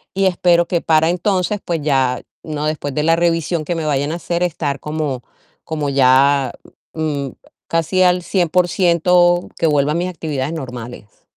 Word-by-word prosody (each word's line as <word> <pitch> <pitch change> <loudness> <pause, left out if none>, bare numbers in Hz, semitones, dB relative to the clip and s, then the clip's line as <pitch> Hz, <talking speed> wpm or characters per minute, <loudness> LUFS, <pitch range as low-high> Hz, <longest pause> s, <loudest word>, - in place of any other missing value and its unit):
y, 195 0 +2
espero 175 -2 +3
que 170 -2 0
para 160 0 +3
entonces, 185 +2 0
pues 165 -3 -2
ya, 135 -3 +1 0.2
¿no?, 150 -1 -4
después 155 -2 -3
de 150 - 0
la 165 +1 +4
revisión 165 -1 0
que 175 - -2
me 160 -1 -3
vayan 145 0 0
a - - -2
hacer, 170 0 -3
estar 145 -5 -2
como 150 -4 -3 0.4
como 150 -3 -3
ya, 135 +1 +3 0.4
mm, 150 -4 -2 0.4
casi 165 +3 +1
al 180 0 +3
100% 175 0 +2
que 165 - +1
vuelva 145 -1 +2
a - - -2
mis 175 +2 -1
actividades 155 -4 -4
normales. 125 -7 -8
160 Hz, 165 wpm, -18 LUFS, 145-175 Hz, 0.4 s, la